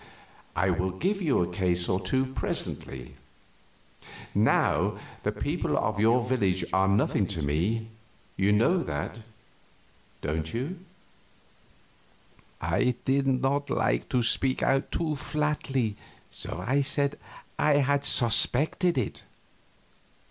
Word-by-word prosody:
I 95 +1 +2
will 90 +2 0
give 190 - -1
you 145 - +2
a - - -2
case 90 -1 0
or 95 -1 +1
two 130 +5 0
presently. 65 - -4 1.2
Now - - +2 0.2
the - - 0
people - - -2
of 105 0 0
your 115 +3 +3
village 95 -8 +1
are 95 0 +3
nothing 100 0 +2
to 85 -6 -3
me 90 +11 0 0.5
you 100 +2 +2
know 115 - +3
that, 90 - -4 1.0
don't 80 +1 -3
you?" 150 +10 -3 1.8
I 125 -1 +1
did 135 +1 +2
not 135 +2 +1
like - - 0
to 125 -2 +1
speak 130 +3 +1
out 135 +1 +1
too 160 -3 -1
flatly, 135 -6 -1 0.3
so 90 - -4
I 140 +5 +2
said 140 0 +1 0.4
I 150 - +4
had 140 0 +2
suspected 140 - +3
it. 125 - -2
120 Hz, 120 wpm, -27 LUFS, 95-140 Hz, 1.8 s, I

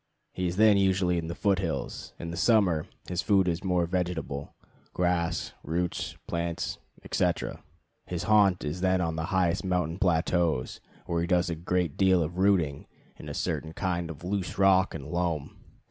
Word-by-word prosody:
He 90 -1 -1
is 85 - -2
then 105 0 +6
usually 95 -2 +2
in 80 - -5
the 85 - -4
foot 100 -1 +2
hills. 85 -4 -4
In 85 - -6
the - - -5
summer 90 -5 +3 0.2
his 90 -1 -1
food 95 -3 +3
is 85 0 -1
more 90 -2 +2
vegetable 85 -5 -3 0.4
grass, 90 -2 0
roots, 85 +3 -2
plants, 85 0 -3 0.2
etc. - - -1 0.5
His 90 -2 -3
haunt 100 -4 +4
is 75 +5 -3
then 95 0 +3
on 80 -2 -1
the 80 0 -2
highest 95 0 +1
mountain 90 -2 -1
plateaus, 85 -6 +1 0.3
where 85 -1 -1
he 85 - -1
does 90 0 +2
a - - -1
great 85 -1 -1
deal 95 -3 +4
of 85 +4 -5
rooting 90 -8 +2 0.3
in - - -9
a - - -5
certain 80 0 -2
kind 85 -2 -2
of 80 0 -9
loose 95 0 -3
rock 95 -2 +4
and 70 -4 -6
loam. 80 -2 -2
90 Hz, 175 wpm, -28 LUFS, 85-95 Hz, 0.5 s, then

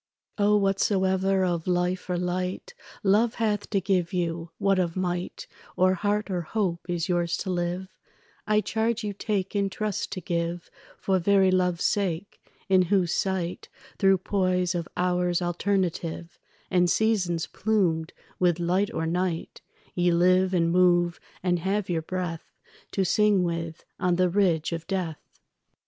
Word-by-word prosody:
O, 205 +1 +4
whatsoever 190 -1 +2
of 170 -2 -2
life 180 +1 0
or 180 - 0
light 180 - -3 0.3
Love 215 +4 +3
hath 210 -3 -1
to 200 - +1
give 185 -1 0
you, 170 -2 -2
what 195 -1 +2
of 170 -2 -1
might 180 -1 -3 0.3
Or 185 +1 +4
heart 205 +2 -1
or 180 -2 -1
hope 175 -1 -2
is 175 -1 -1
yours 175 -1 0
to 190 - -3
live, 175 +1 -2 0.6
I 210 0 +3
charge 225 +1 -1
you 205 -1 -3
take 200 -1 -2
in 200 -1 +1
trust 210 0 -3
to - - -4
give 170 0 -3 0.3
For 190 -1 +1
very 190 +1 +4
love's 180 -2 +1
sake, 195 -1 -1 0.3
in 190 -2 +5
whose 180 -1 +1
sight, 185 -2 -2 0.3
Through 195 -2 +5
poise 185 -1 0
of 170 -1 -3
hours 180 -1 +1
alternative 175 -2 -2 0.3
And 180 -1 +3
seasons 180 -6 +1
plumed 180 -7 0 0.3
with 175 -2 +2
light 185 +5 +1
or 165 - -2
night, 175 0 -2 0.3
Ye 175 0 +2
live 185 +2 +3
and 170 -2 +2
move 175 -1 +3 0.2
and 175 -1 +1
have 190 +2 -1
your 165 -2 0
breath 175 -1 -5 0.4
To 195 - +1
sing 205 0 +3
with 165 -1 -4
on 180 -1 +2
the 180 0 +2
ridge 175 -4 +1
of 165 -1 -5
death. 180 -5 -3
180 Hz, 150 wpm, -26 LUFS, 175-195 Hz, 0.6 s, in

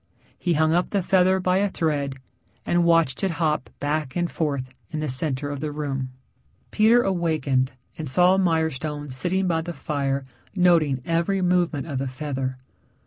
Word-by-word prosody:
He 175 - +1
hung 160 0 +3
up 175 +1 +1
the 200 -3 0
feather 190 +1 +3
by 185 0 +1
a 200 +1 +2
thread 145 -6 -1 0.5
and 175 0 +2
watched 165 -4 +2
it 195 - +2
hop 155 -5 0
back 145 -1 -2
and 175 -1 -1
forth 140 -5 -2 0.2
in 155 - -5
the 155 - -2
center 140 +1 -2
of 145 - -4
the 150 0 -3
room. 140 -3 -3 0.6
Peter 225 +3 +5
awakened 155 -8 0 0.3
and 155 -3 -1
saw 180 +7 +5
Mirestone 155 -4 -1
sitting 185 +8 0
by 165 -2 +1
the 175 +1 -5
fire 140 -2 -2 0.3
noting 165 -8 +3
every 170 +3 0
movement 175 -5 +1
of 140 -5 -3
the 135 - -2
feather. 130 -1 -4
155 Hz, 165 wpm, -24 LUFS, 140-175 Hz, 0.6 s, Peter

